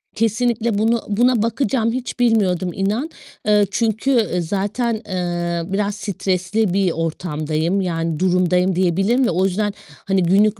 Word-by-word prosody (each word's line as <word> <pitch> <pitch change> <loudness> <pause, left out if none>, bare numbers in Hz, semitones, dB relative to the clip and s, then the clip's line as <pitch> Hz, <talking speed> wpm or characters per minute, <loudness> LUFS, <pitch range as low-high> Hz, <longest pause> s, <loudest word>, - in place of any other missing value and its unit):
Kesinlikle 230 0 0
bunu 225 +2 +2
buna 240 +2 +2
bakacağım. 230 -1 0
Hiç 255 +1 -5
bilmiyordum 195 -7 +2
inan. 210 +10 -1 0.4
Eee, 210 -1 +4
çünkü, 225 +4 0
eee, 215 -8 +1
zaten, 205 +7 -1
eee, 175 -2 -2
biraz 205 0 0
stresli 195 0 -1
bir 190 -2 +2
ortamdayım 160 +2 -2
yani 165 -3 -2
durumdayım 180 0 +2
diyebilirim 195 +8 +2
ve - - +1
o 185 +3 +1
yüzden 205 +2 0 0.3
hani, 195 -1 +2
günlük 200 +5 +3
195 Hz, 135 wpm, -20 LUFS, 180-225 Hz, 0.4 s, Eee